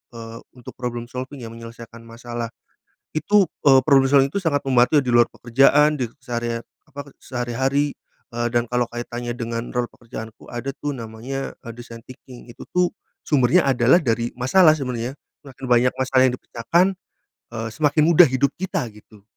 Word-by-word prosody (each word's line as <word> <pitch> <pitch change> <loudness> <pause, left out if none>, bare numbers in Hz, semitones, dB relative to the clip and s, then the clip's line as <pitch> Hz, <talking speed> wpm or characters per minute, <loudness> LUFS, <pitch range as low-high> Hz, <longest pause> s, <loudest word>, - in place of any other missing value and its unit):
eee, 115 0 -8 0.2
untuk 125 -2 -11
problem 120 -1 -4
solving 130 +1 -7
ya, 115 - -8
menyelesaikan 115 0 -11
masalah. 120 0 -6 0.7
Itu, 195 +6 +3 0.2
eee, 135 -2 +7
problem 135 -3 +5
solving 140 -1 +4
tuh 200 - -1
sangat 145 -4 +1
membantu 130 +2 +4
di 125 - -4
luar 120 0 +5
pekerjaan, 140 +5 +3
di 120 - -1
sehari 120 -2 -3 0.3
apa, 140 +1 -9
eee, - - -49
sehari-hari, 130 +3 -1 0.5
eee, 120 0 -1
dan 120 0 +2
kalau 125 0 +1
kaitannya 120 0 -5
dengan 115 0 -4
rol 125 0 0
pekerjaanku 115 -2 -10
ada 130 +3 -4
tuh, 145 0 -3
namanya, 115 +4 -6
eee, 115 - -7
design 120 -1 -11
thinking. 125 -1 -13
Itu 115 - -12
tuh, 180 -1 +2 0.3
sumbernya 140 +4 +3
adalah 130 +5 +4
dari 115 -4 -1
masalah, 155 +6 +5
sebenarnya. 125 -3 -4 0.3
Semakin 135 -1 -10
banyak 125 +1 +4
masalah 130 0 +2
yang 125 - -1
dipecahkan, 170 +10 +1 0.7
eee, 115 -1 -3
semakin 150 0 +2
mudah 170 +1 +7
hidup 130 +2 +1
kita, 185 -5 -2
gitu. 105 -1 -18
125 Hz, 165 wpm, -22 LUFS, 120-140 Hz, 0.7 s, eee